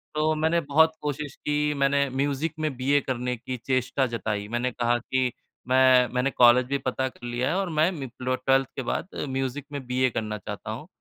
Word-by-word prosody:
तो 155 +1 +2
मैंने 160 +2 +2
बहुत 160 +2 +4
कोशिश 145 -1 -4
की, 150 0 0
मैंने 140 0 +2
म्यूज़िक 140 +4 -1
में 155 -3 -1
बीए 140 +3 +3
करने 125 -1 -2
की 125 +2 -5
चेष्टा 130 +1 +1
जताई, 105 -3 -3
मैंने 120 +3 -1
कहा 120 0 +1
कि 130 +1 -1 0.4
मैं 130 -1 +5
मैंने 125 +2 +1
कॉलेज 125 0 +6
भी 140 +1 0
पता 130 0 -2
कर 125 - -13
लिया 120 +1 -1
है - - 0
और 195 -2 -1
मैं 155 +3 +3
मी 140 -8 -6
लो 130 0 0
12th 135 +1 +2
के - - -2
बाद 125 - -2 0.2
म्यूज़िक 135 +1 -3
में 140 -2 -5
बीए 130 +1 +2
करना 105 -2 -3
चाहता 105 +1 -7
हूँ। 125 +8 -7
130 Hz, 200 wpm, -26 LUFS, 125-145 Hz, 0.4 s, कॉलेज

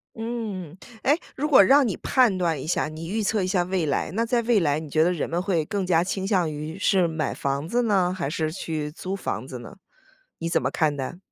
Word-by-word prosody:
嗯。 220 -7 -5 0.3
诶， 290 +3 +4 0.2
如 295 +3 -1
果 260 -8 +8
让 270 +5 +5
你 200 - -2
判 245 -7 +3
断 165 -6 0
一 - - -6
下， 160 - 0
你 160 +2 -7
预 215 +4 -1
测 205 -1 +1
一 - - -1
下 185 -2 +1
未 180 -2 -1
来， 140 - -1
那 225 +4 0
在 235 0 +1
未 230 -3 +3
来 150 -3 +1
你 155 -1 -8
觉 155 +2 +3
得 175 - +3
人 170 - -2
们 170 +2 -1
会 180 -5 0
更 195 +2 -2
加 170 -2 +3
倾 190 +1 -3
向 180 -6 +1
于 155 +3 -6
是 190 -4 +3
买 160 -1 -2
房 140 +2 -2
子 240 +7 +1
呢， 190 -5 +2
还 140 -6 -2
是 155 +1 -1
去 155 -3 -4
租 185 +4 -5
房 155 -8 -4
子 125 -3 -7
呢？ 120 - -11 0.6
你 165 0 -2
怎 - - +2
么 - - 0
看 155 -3 +1
待？ 135 +6 -4
180 Hz, 260 characters per minute, -25 LUFS, 155-205 Hz, 0.6 s, 果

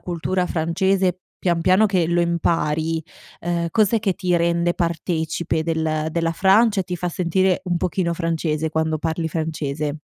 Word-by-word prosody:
cultura 180 +1 -2
francese 180 +2 0 0.2
pian 170 -2 0
piano 185 +5 +4
che 185 -5 +1
lo 175 +1 +1
impari? 165 -1 0 0.4
Ehm, 170 0 -1
cos'è 220 +2 +3
che 200 -4 0
ti 180 -1 0
rende 170 0 +1
partecipe 165 -1 -1
del 160 -1 -1
della 165 0 0
Francia, 200 +4 +4
e - - +1
ti 180 -1 -4
fa 180 +1 -2
sentire 185 +1 +1
un 175 -2 0
pochino 175 0 -1
francese 160 -2 -1
quando 160 0 0
parli 160 +1 -2
francese? 155 -2 -3
170 Hz, 155 wpm, -22 LUFS, 160-180 Hz, 0.4 s, piano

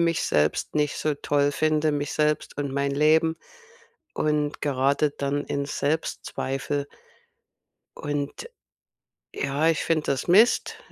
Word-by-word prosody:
mich 170 -1 +1
selbst 75 - 0
nicht 150 -1 0
so 155 -1 0
toll 145 0 +1
finde 155 0 +1
mich 145 0 -2
selbst 150 0 0
und 140 -2 -2
mein 140 0 0
Leben, 160 +3 +3 0.8
und 150 -1 0
grade 140 +1 +1
dann 145 0 -2
in 140 0 -2
Selbstzweifel 145 -1 -2 1.1
Und 145 - -4 0.8
ja, 140 +3 0
ich 160 - +1
finde 155 -2 0
das 135 -2 -1
Mist. 215 +8 +4
145 Hz, 120 wpm, -25 LUFS, 140-155 Hz, 1.1 s, Mist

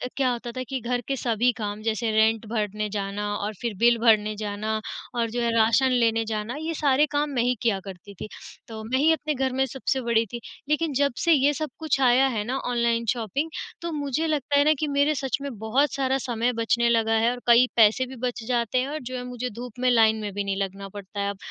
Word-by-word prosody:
क्या 265 -2 +2
होता 240 0 -5
था 255 +2 -5
कि 265 -1 -2
घर 245 +1 -1
के 275 - 0
सभी 240 0 +1
काम 210 -1 -4
जैसे 225 +1 -1
रेंट 220 +1 +2
भरने 210 -1 -2
जाना 200 0 -3
और 205 +1 -3
फिर 235 -2 -2
बिल 235 0 +5
भरने 215 -2 +3
जाना 215 +1 -3 0.4
और 230 -1 0
जो 240 +1 -2
है 235 -1 +1
राशन 230 +4 +4
लेने 230 -2 +2
जाना, 215 +2 -3
ये 320 +1 -3
सारे 290 -2 +3
काम 295 0 0
मैं 245 - +1
ही 250 +1 +1
किया 220 -5 +1
करती 195 +1 -10
थी। - - -4 0.4
तो 220 -1 -8
मैं 240 +4 -1
ही 310 +3 +4
अपने 305 -1 -2
घर 265 -1 -1
में 265 +1 +2
सबसे 265 0 -2
बड़ी 230 -1 +2
थी, 235 +3 -7 0.3
लेकिन 305 0 +1
जब 280 0 +1
से 340 - +3
ये 285 0 +3
सब 305 +2 -3
कुछ 315 -4 0
आया 255 +1 +5
है 225 -5 -2
ना 255 +4 -2
ऑनलाइन 235 -2 0
शॉपिंग 245 - -2 0.3
तो 340 0 -4
मुझे 290 +1 -1
लगता 290 -2 0
है 285 - +5
ना 305 - +5
कि 310 - 0
मेरे 285 +1 +2
सच 270 -2 -1
में 280 - -4
बहुत 250 +7 +1
सारा 265 -1 +1
समय 245 -2 -1
बचने 235 +1 +1
लगा 225 -1 +2
है 230 +2 +3
और 250 - -5
कई 240 +1 +7
पैसे 225 +3 +5
भी 260 +1 -10
बच 245 -2 -3
जाते 240 -1 0
हैं 260 - -2
और 305 +1 -4
जो 255 +1 -6
है 250 - -5
मुझे 250 0 -4
धूप 245 +2 -9
में 255 0 +2
लाइन 220 -2 +5
में 205 -1 -4
भी 205 +1 -2
नहीं 195 -1 -2
लगना 195 0 -4
पड़ता 200 +1 -8
है 200 0 0
अब। 200 - -5
240 Hz, 245 wpm, -25 LUFS, 220-265 Hz, 0.4 s, कई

